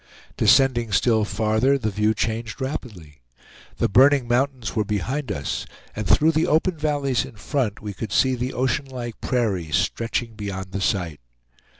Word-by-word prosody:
Descending 125 Hz, -5 st, +3 dB
still 110 Hz, +2 st, +3 dB
farther, 110 Hz, +6 st, +1 dB
the 110 Hz, -5 st, -2 dB
view 105 Hz, +2 st, +1 dB
changed 110 Hz, +1 st, -3 dB
rapidly. 105 Hz, -, -6 dB, 0.6 s
The -, -, +2 dB
burning 130 Hz, +3 st, +5 dB
mountains 125 Hz, -3 st, 0 dB
were 110 Hz, -, +2 dB
behind 115 Hz, +6 st, -2 dB
us, 70 Hz, -5 st, -3 dB, 0.3 s
and 105 Hz, -2 st, -3 dB
through 155 Hz, -, +4 dB
the 160 Hz, +1 st, +1 dB
open 165 Hz, +4 st, +2 dB
valleys 145 Hz, -4 st, 0 dB
in 135 Hz, -3 st, -11 dB
front 110 Hz, -1 st, -2 dB
we 105 Hz, -1 st, -5 dB
could 100 Hz, +2 st, -6 dB
see 130 Hz, +4 st, +3 dB
the 125 Hz, +1 st, -2 dB
ocean 130 Hz, +2 st, 0 dB
like 125 Hz, -4 st, -7 dB
prairie, 105 Hz, -10 st, -1 dB
stretching 115 Hz, +6 st, -1 dB
beyond 100 Hz, -3 st, -6 dB
the 100 Hz, +1 st, -3 dB
sight. 90 Hz, -7 st, -1 dB
115 Hz, 160 wpm, -23 LUFS, 105-135 Hz, 0.6 s, burning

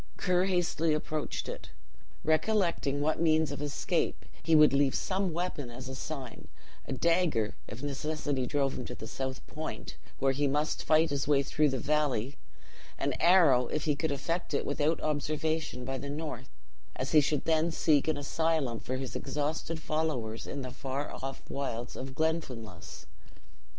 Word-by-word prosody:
Ker 180 Hz, 0 st, +2 dB
hastily 170 Hz, -4 st, +1 dB
approached 155 Hz, 0 st, -3 dB
it, -, -, -6 dB, 0.5 s
recollecting 160 Hz, -4 st, +2 dB
what 155 Hz, +2 st, +1 dB
means 160 Hz, -1 st, +3 dB
of -, -, -5 dB
escape, 150 Hz, +3 st, -1 dB, 0.2 s
he 165 Hz, -, +3 dB
would 150 Hz, -2 st, +7 dB
leave 140 Hz, -1 st, +3 dB
some 190 Hz, -1 st, 0 dB
weapon 160 Hz, -6 st, -3 dB
as 125 Hz, +2 st, -8 dB
a 130 Hz, -, -5 dB
sign; 135 Hz, -3 st, -6 dB, 0.4 s
a -, -, -5 dB
dagger, 165 Hz, -7 st, +2 dB
if 110 Hz, +6 st, -8 dB
necessity 145 Hz, -2 st, -1 dB
drove 140 Hz, 0 st, +1 dB
him -, -, -3 dB
to -, -, -6 dB
the -, -, -8 dB
south 130 Hz, +2 st, -4 dB
point, 155 Hz, +1 st, -6 dB, 0.2 s
where 135 Hz, 0 st, +3 dB
he 140 Hz, +2 st, +1 dB
must 150 Hz, +3 st, 0 dB
fight 160 Hz, 0 st, +4 dB
his 140 Hz, -1 st, -1 dB
way 140 Hz, -2 st, +4 dB
through 150 Hz, +2 st, +2 dB
the 130 Hz, -, -1 dB
valley; 145 Hz, -3 st, 0 dB, 0.6 s
an -, -, 0 dB
arrow, 160 Hz, -8 st, +6 dB
if 150 Hz, -, -2 dB
he 150 Hz, -2 st, +2 dB
could 160 Hz, +1 st, -1 dB
effect 165 Hz, +3 st, -2 dB
it -, -, 0 dB
without 150 Hz, +3 st, +1 dB
observation, 155 Hz, -2 st, -1 dB
by 135 Hz, 0 st, -3 dB
the 140 Hz, -, -5 dB
north, 145 Hz, -4 st, -5 dB, 0.5 s
as 130 Hz, -, -3 dB
he 155 Hz, -, +7 dB
should 145 Hz, 0 st, 0 dB
then 160 Hz, +1 st, +3 dB
seek 155 Hz, -3 st, +3 dB
an 155 Hz, -, +1 dB
asylum 145 Hz, -4 st, 0 dB
for 130 Hz, -, -3 dB
his 130 Hz, -1 st, -5 dB
exhausted 155 Hz, +2 st, -2 dB
followers 150 Hz, -9 st, -2 dB
in 140 Hz, -, -4 dB
the 135 Hz, +1 st, -4 dB
wilds 120 Hz, -3 st, -4 dB
of 130 Hz, 0 st, -6 dB
Glenfinlass. 155 Hz, -8 st, -3 dB
145 Hz, 160 wpm, -31 LUFS, 135-160 Hz, 0.6 s, would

